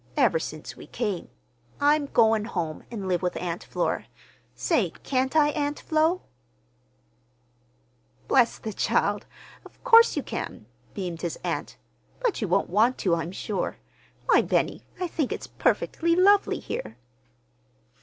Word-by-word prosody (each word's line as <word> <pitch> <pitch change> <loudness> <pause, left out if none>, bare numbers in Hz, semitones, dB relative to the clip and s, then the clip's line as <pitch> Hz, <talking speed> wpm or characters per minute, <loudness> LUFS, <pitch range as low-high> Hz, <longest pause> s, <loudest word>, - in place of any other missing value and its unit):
ever 485 - +4
since - - -7
we - - -12
came. 205 -7 -3 0.5
I'm 290 0 +3
going 220 -4 +3
home 170 -8 -3
an' 205 -5 -5
live 180 -2 +1
with 180 -1 -1
Aunt 175 -1 -4
Flora. - - -2 0.5
Say, - - +1
can't 260 +1 0
I, 300 -1 +5
Aunt 290 -1 -2
Flo?" 320 +3 +1 2.0
"Bless 245 -3 +4
the 220 - -6
child! - - 0 0.4
Of - - -18
course 465 -7 +7
you 290 - 0
can," 110 - -5 0.3
beamed 175 -4 -4
his 170 -2 -3
aunt. - - -3 0.4
"But 485 - 0
you 210 - 0
won't 185 +1 +1
want 225 +6 +3
to, 180 - +1
I'm 165 +1 -1
sure. 200 +1 -3 0.5
Why, - - +5
Benny, - - 0 0.2
I 365 - 0
think 320 -5 -2
it's - - -4
perfectly 335 0 +1
lovely 400 +3 +4
here." 110 +2 -6
240 Hz, 140 wpm, -26 LUFS, -, 2.0 s, course